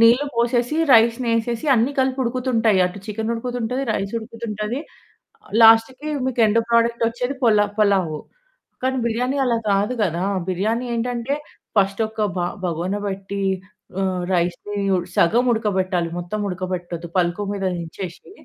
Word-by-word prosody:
నీళ్లు 240 +5 +5
పోసేసి, 240 +4 +1 0.2
రైస్‌ని 230 +1 +4
ఎసేసి 235 +5 -3
అన్నీ 240 +4 +2
కలిపి 260 0 0
ఉడుకుతుంటాయి. 235 -4 +1
అటు 180 +2 -7
చికెన్ 220 +1 -3
ఉడుకుతుంటది, 245 +2 -3
రైస్ 195 +1 -3
ఉడుకుతుంటది. 225 +1 -5 0.7
ఆహ్, - - -19
లాస్ట్‌కి 225 +6 +5 0.2
మీకు 245 -2 0
ఎండ్ 220 +2 +3
ప్రొడక్ట్ 235 0 +3
వచ్చేది 245 +4 -3
పలా 210 -3 +5
పలావు. 190 -7 +2 0.6
కానీ 260 0 +1
బిర్యానీ 250 +4 0
అలా 235 -2 +2
కాదు 205 +5 +1
కదా, 175 -1 -1 0.3
బిర్యానీ 220 +7 0
ఏంటంటే, 245 +3 -1 0.4
ఫస్ట్ 195 +2 +2
ఒక్క 220 0 -6 0.2
బ - - 0 0.3
బగోన 175 +3 -2
బట్టి 195 +1 -4 0.6
ఆహ్, 185 -2 -1
రైస్‌ని 175 +4 -2 0.4
సగం 230 +9 +4
ఉడకబెట్టాలి. 190 -6 0
మొత్తం 175 +5 -4
ఉడకబెట్టొద్దు 180 -2 -4
పల్కు 175 +3 +1
మీద 195 -1 -3
నించేసి. 170 - -7
220 Hz, 135 wpm, -22 LUFS, 190-240 Hz, 0.7 s, నీళ్లు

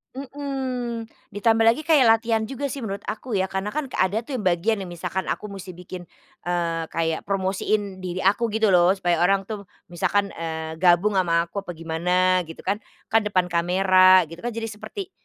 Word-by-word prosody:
Mhm, 265 -4 -4 0.3
ditambah 225 +2 +3
lagi 235 +7 +3
kayak 300 -6 +5
latihan 225 0 +3
juga 275 +2 -4
sih 280 - -5
menurut 200 -4 -5
aku 220 +1 -4
ya 190 - +2
karena 190 +2 -2
kan 305 -1 -1
kek - - -5
ada 200 +5 +1
tuh 260 +1 -4
yang 210 - -5
bagian 185 +5 +1
yang 190 - -5
misalkan 175 +2 -4
aku 210 - -3
musti 190 -2 -8
bikin, 180 0 -9 0.4
eee, 170 -2 -1
kayak 165 +1 -2
promosiin 195 0 -1
diri 185 0 -4
aku 205 +5 +3
gitu 220 -1 +2
loh 180 +1 +5
supaya 175 -3 0
orang 195 +2 +3
tuh 200 -1 -7 0.2
misalkan, 200 +3 0
eee, 160 -1 -5
gabung 180 +4 +4
ama 170 -2 +2
aku 185 +4 -5
apa 180 -3 -7
gimana 180 +3 +1
gitu 165 - -10
kan. 200 +2 -1 0.3
Kan 215 -1 +3
depan 185 -3 0
kamera 185 +2 +5
gitu 165 - -9
kan 240 - -3
jadi 230 0 -3
seperti 385 - -8
195 Hz, 190 wpm, -24 LUFS, 175-225 Hz, 0.4 s, kayak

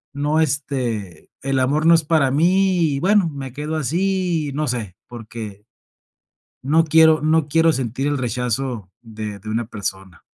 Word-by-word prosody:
no, 150 +2 0
este, 125 - -3
el 135 0 0
amor 145 +5 +1
no 170 - +7
es 165 - +2
para 150 -4 +2
mí 185 +6 +2 0.2
y - - -2
bueno 195 -1 +3
me 135 -3 -7
quedo 150 +3 -4
así, 170 0 -1
no 150 +1 -2
sé, 110 -7 -4
porque, 110 -3 -9 1.0
no 160 +5 +3
quiero 160 0 +5
no 155 -1 +2
quiero 165 +2 +3
sentir 130 +2 -3
el 145 0 0
rechazo 125 -4 -3
de 110 -3 -7
de 110 +3 -8
una 115 +1 -1
persona. 95 -4 -6
140 Hz, 155 wpm, -21 LUFS, 115-160 Hz, 1.0 s, no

